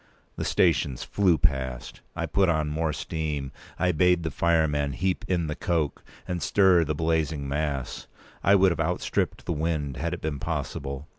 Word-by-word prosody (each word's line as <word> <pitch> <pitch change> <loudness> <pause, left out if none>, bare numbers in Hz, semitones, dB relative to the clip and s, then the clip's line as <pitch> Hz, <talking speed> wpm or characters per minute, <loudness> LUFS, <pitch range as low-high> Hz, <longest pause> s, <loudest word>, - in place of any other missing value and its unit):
The - - -3
stations 80 -7 +2
flew 95 -5 +2
past. 65 -6 -1
I - - -2
put 95 -2 +2
on 80 -2 +1
more 80 +1 0
steam; 75 -2 -3 0.3
I 90 -1 +2
bade 90 +1 +3
the 80 - -2
fireman 75 -4 +1
heap 95 +3 -1
in 90 -3 +1
the 75 - -2
coke, 80 -5 -1 0.2
and 90 -1 -3
stir 95 +1 +4
the 75 -1 -2
blazing 80 -2 0
mass. 70 -3 -3 0.4
I 100 - +6
would 95 -1 +5
have 85 - -3
outstripped 85 +2 -1
the - - -1
wind, 75 -3 -2
had 85 +2 -2
it 85 - -12
been 75 -3 -3
possible. 70 +2 -4
80 Hz, 170 wpm, -26 LUFS, 75-85 Hz, 0.4 s, I